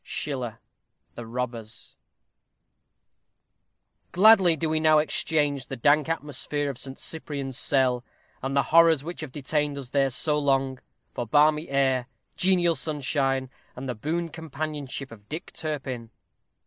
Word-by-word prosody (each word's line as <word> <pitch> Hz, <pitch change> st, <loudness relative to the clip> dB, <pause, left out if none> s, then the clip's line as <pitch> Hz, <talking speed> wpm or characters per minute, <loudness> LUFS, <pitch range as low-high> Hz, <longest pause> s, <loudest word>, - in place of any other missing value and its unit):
SCHILLER: 125 Hz, -6 st, -3 dB, 0.5 s
The 120 Hz, -1 st, -8 dB
Robbers. 120 Hz, -1 st, -5 dB, 2.2 s
Gladly 190 Hz, -3 st, +6 dB
do 160 Hz, +1 st, -1 dB
we 155 Hz, 0 st, +1 dB
now 155 Hz, 0 st, +5 dB
exchange 150 Hz, -2 st, +1 dB
the 135 Hz, -, -5 dB
dank 145 Hz, +5 st, +3 dB
atmosphere 145 Hz, -2 st, -2 dB
of 130 Hz, -, -10 dB
Saint 135 Hz, -1 st, -4 dB
Cyprian's 140 Hz, -4 st, -4 dB
cell, 130 Hz, -3 st, +2 dB, 0.4 s
and 135 Hz, +2 st, -2 dB
the 140 Hz, -, +4 dB
horrors 165 Hz, -3 st, +6 dB
which 170 Hz, +2 st, -6 dB
have 155 Hz, -4 st, -6 dB
detained 145 Hz, +1 st, -1 dB
us 130 Hz, -3 st, -7 dB
there 140 Hz, -1 st, +2 dB
so 150 Hz, +4 st, +1 dB
long, 135 Hz, -2 st, +1 dB, 0.3 s
for 120 Hz, -, -4 dB
balmy 150 Hz, +5 st, +3 dB
air, 135 Hz, -2 st, +1 dB, 0.3 s
genial 180 Hz, -2 st, +3 dB
sunshine, 135 Hz, -3 st, -1 dB, 0.2 s
and 130 Hz, +2 st, -6 dB
the 125 Hz, -, -2 dB
boon 165 Hz, +9 st, -3 dB
companionship 150 Hz, -4 st, -5 dB
of 105 Hz, -2 st, -14 dB
Dick 160 Hz, +3 st, -6 dB
Turpin. 135 Hz, -7 st, -4 dB
140 Hz, 135 wpm, -26 LUFS, 130-155 Hz, 2.2 s, Gladly